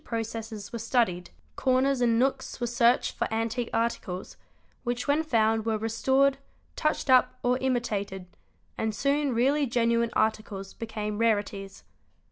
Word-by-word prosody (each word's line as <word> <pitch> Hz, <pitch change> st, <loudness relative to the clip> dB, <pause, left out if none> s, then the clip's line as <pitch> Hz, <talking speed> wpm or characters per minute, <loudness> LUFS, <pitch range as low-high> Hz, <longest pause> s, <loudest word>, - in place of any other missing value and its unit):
841 230 Hz, -, -3 dB, 0.2 s
processes 215 Hz, -2 st, -9 dB
were 235 Hz, -, -3 dB
studied; 225 Hz, -7 st, 0 dB, 0.3 s
corners 260 Hz, 0 st, +2 dB
and 230 Hz, -2 st, +3 dB
nooks 265 Hz, +2 st, 0 dB
were 240 Hz, -, -1 dB
searched 240 Hz, +1 st, +2 dB
for -, -, -2 dB
antique 230 Hz, +2 st, -1 dB
articles, 210 Hz, -5 st, -2 dB, 0.5 s
which 240 Hz, +1 st, -2 dB
when 290 Hz, +2 st, +3 dB
found 225 Hz, -7 st, +2 dB
were 220 Hz, 0 st, 0 dB
restored, 265 Hz, +5 st, +2 dB, 0.4 s
touched 305 Hz, -1 st, 0 dB
up, 255 Hz, -1 st, +4 dB
or 250 Hz, +1 st, +2 dB
imitated; 210 Hz, -7 st, -2 dB, 0.5 s
and 220 Hz, -1 st, -1 dB
soon 280 Hz, +4 st, +1 dB
really 275 Hz, +5 st, +2 dB
genuine 235 Hz, -1 st, +2 dB
articles 215 Hz, -3 st, -1 dB
became 210 Hz, -2 st, -4 dB
rareties. 205 Hz, -3 st, -1 dB
230 Hz, 135 wpm, -27 LUFS, 220-255 Hz, 0.5 s, up